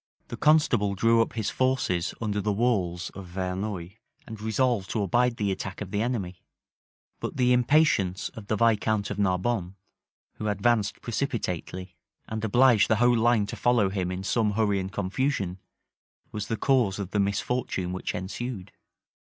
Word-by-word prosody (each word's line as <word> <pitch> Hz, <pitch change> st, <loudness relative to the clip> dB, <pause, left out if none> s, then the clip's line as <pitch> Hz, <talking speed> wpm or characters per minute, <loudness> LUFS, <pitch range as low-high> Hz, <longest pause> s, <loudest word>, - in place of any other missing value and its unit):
The -, -, -4 dB
constable 125 Hz, -10 st, +3 dB
drew 115 Hz, +3 st, +4 dB
up 115 Hz, -, -1 dB
his 110 Hz, -3 st, -2 dB
forces 130 Hz, -10 st, 0 dB
under 105 Hz, -2 st, -1 dB
the 105 Hz, +1 st, 0 dB
walls 100 Hz, -6 st, 0 dB
of 95 Hz, -2 st, -9 dB
Verneuil, 95 Hz, 0 st, -3 dB, 0.4 s
and 110 Hz, -2 st, -9 dB
resolved 110 Hz, -2 st, 0 dB
to 110 Hz, -, -1 dB
abide 120 Hz, +5 st, +2 dB
the 100 Hz, -2 st, 0 dB
attack 95 Hz, 0 st, -5 dB
of 100 Hz, -2 st, -6 dB
the 105 Hz, -, 0 dB
enemy: 100 Hz, -7 st, -3 dB, 0.8 s
but -, -, -5 dB
the 125 Hz, -1 st, +4 dB
impatience 125 Hz, -, +2 dB
of 105 Hz, -3 st, -11 dB
the 110 Hz, -, +1 dB
viscount 110 Hz, -2 st, +1 dB
of 105 Hz, -, -4 dB
Narbonne, 95 Hz, 0 st, 0 dB, 0.6 s
who 110 Hz, -, -3 dB
advanced 105 Hz, +1 st, +1 dB
precipitately, 95 Hz, -, -3 dB, 0.3 s
and 110 Hz, 0 st, -4 dB
obliged 120 Hz, 0 st, +5 dB
the 110 Hz, -, +3 dB
whole 120 Hz, +2 st, +4 dB
line 115 Hz, -2 st, +3 dB
to -, -, -6 dB
follow 120 Hz, -5 st, +2 dB
him 95 Hz, -2 st, -2 dB
in 90 Hz, +1 st, -4 dB
some 105 Hz, +1 st, +1 dB
hurry 105 Hz, -2 st, +1 dB
and 95 Hz, 0 st, -4 dB
confusion, 100 Hz, -1 st, -1 dB, 0.7 s
was 105 Hz, -1 st, -4 dB
the 115 Hz, -, -2 dB
cause 120 Hz, -5 st, +2 dB
of 100 Hz, -2 st, -5 dB
the 105 Hz, -, 0 dB
misfortune 100 Hz, -2 st, -1 dB
which 95 Hz, -, -4 dB
ensued. 100 Hz, +1 st, -5 dB
105 Hz, 160 wpm, -27 LUFS, 95-120 Hz, 0.8 s, obliged